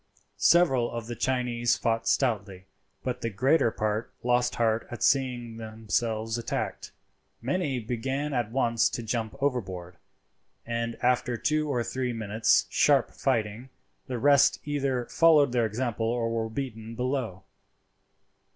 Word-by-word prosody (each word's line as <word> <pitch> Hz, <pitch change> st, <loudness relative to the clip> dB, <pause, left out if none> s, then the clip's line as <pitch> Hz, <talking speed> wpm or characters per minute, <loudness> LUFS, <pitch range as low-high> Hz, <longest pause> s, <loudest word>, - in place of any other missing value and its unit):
Several 135 Hz, -9 st, +4 dB
of 115 Hz, -1 st, -5 dB
the 120 Hz, +1 st, -5 dB
Chinese 120 Hz, -1 st, 0 dB
fought 115 Hz, 0 st, -1 dB
stoutly, 100 Hz, -7 st, 0 dB, 0.4 s
but 125 Hz, -1 st, -3 dB
the 115 Hz, -, -1 dB
greater 125 Hz, +6 st, +3 dB
part 110 Hz, +1 st, -2 dB
lost 125 Hz, 0 st, +2 dB
heart 115 Hz, -1 st, +1 dB
at 120 Hz, -, -5 dB
seeing 125 Hz, -4 st, +1 dB
themselves 110 Hz, 0 st, -2 dB
attacked. 115 Hz, -, -4 dB, 0.5 s
Many 140 Hz, +1 st, -1 dB
began 130 Hz, +6 st, -3 dB
at 120 Hz, -4 st, 0 dB
once 115 Hz, -3 st, +2 dB
to 120 Hz, -, -5 dB
jump 115 Hz, +1 st, -3 dB
overboard, 95 Hz, -10 st, -3 dB, 0.7 s
and 115 Hz, 0 st, -3 dB
after 125 Hz, -1 st, +1 dB
two 155 Hz, +4 st, 0 dB
or 125 Hz, -4 st, 0 dB
three 125 Hz, +1 st, -2 dB
minutes' 110 Hz, -1 st, +2 dB
sharp -, -, +3 dB
fighting, 110 Hz, +3 st, -1 dB, 0.4 s
the 125 Hz, -, -3 dB
rest 140 Hz, +2 st, +5 dB
either 135 Hz, -4 st, -1 dB
followed 155 Hz, -4 st, +4 dB
their 120 Hz, -2 st, +2 dB
example 115 Hz, 0 st, -2 dB
or 115 Hz, 0 st, 0 dB
were 115 Hz, -1 st, -1 dB
beaten 115 Hz, -3 st, -6 dB
below. 125 Hz, -7 st, -2 dB
120 Hz, 135 wpm, -27 LUFS, 110-130 Hz, 0.7 s, rest